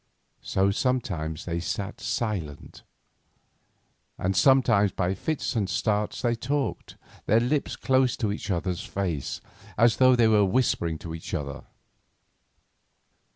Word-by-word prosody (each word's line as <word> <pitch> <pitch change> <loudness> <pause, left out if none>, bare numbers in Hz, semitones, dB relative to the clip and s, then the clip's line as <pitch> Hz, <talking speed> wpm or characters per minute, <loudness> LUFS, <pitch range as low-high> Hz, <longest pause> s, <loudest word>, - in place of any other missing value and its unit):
So 95 +1 +1
sometimes 100 - -2
they 85 -1 -2
sat 100 +4 -4
silent, 95 -11 -4 1.4
and 95 +1 -1
sometimes 115 -7 +4
by 90 0 -1
fits 145 - -3
and 100 -4 0
starts 105 +4 -1
they 120 -1 +2
talked, 140 +4 -3 0.3
their 110 - +5
lips 135 +5 0
close 130 -2 +2
to 105 -3 -1
each 105 - -5
other's 90 0 -1
face, 95 - -3 0.4
as 115 +1 +4
though 130 -1 +6
they 120 -2 +4
were 105 -2 +4
whispering 95 -6 +1
to 85 - -9
one 80 0 -6
another. 70 -5 -4
105 Hz, 125 wpm, -26 LUFS, 90-120 Hz, 1.4 s, though